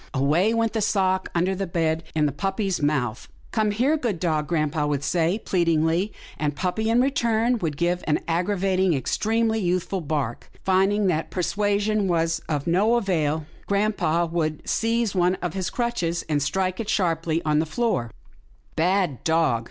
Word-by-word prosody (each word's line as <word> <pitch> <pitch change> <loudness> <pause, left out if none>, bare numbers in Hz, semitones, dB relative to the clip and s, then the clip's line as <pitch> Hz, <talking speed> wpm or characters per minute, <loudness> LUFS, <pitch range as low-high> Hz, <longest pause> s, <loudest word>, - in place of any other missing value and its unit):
away 155 +10 +2
went 230 -1 +1
the 220 - 0
sock 190 -2 +1
under 180 +3 +2
the 195 0 -3
bed 165 -1 0
in 150 -1 +3
puppy's 195 +4 -2
mouth. 135 -6 -1
" - - -27
Come 215 -2 +1
here, 250 +9 +2
good 230 - -2
dog," 155 -4 0
grampa 155 -2 0
would 145 -1 -1
say, 170 +4 +1
pleadingly, 170 +2 +1 0.3
and 150 -1 -1
puppy, 220 +7 -1
in 235 +2 +4
return, 235 -3 +1
would 155 -6 -2
give 175 +2 0
an 150 - +2
aggravating 185 +1 +1
and - - +1
extremely 220 - 0
youthful 185 0 -1
bark. 145 -6 -3 0.2
Find 190 +1 +3
ing 205 0 +1
that 165 -4 0
persuasion 205 +2 0
was 165 -2 +1
of 145 -3 -1
no 200 +7 +3
avail, 160 -8 0 0.2
grampa 200 -5 +1
would 160 -2 -2
seize 230 -1 0
one 180 -1 +2
of 175 -3 -4
his 190 -2 -2
crutches, 180 -9 -2
and 150 -2 0
strike 185 +6 -1
it 220 -2 -4
sharply 165 -5 +1
on 150 -1 +2
the 160 - 0
floor, 185 - -1 0.7
''Bad 175 -4 +1
dog! 160 -7 +2
180 Hz, 165 wpm, -24 LUFS, 160-205 Hz, 0.7 s, in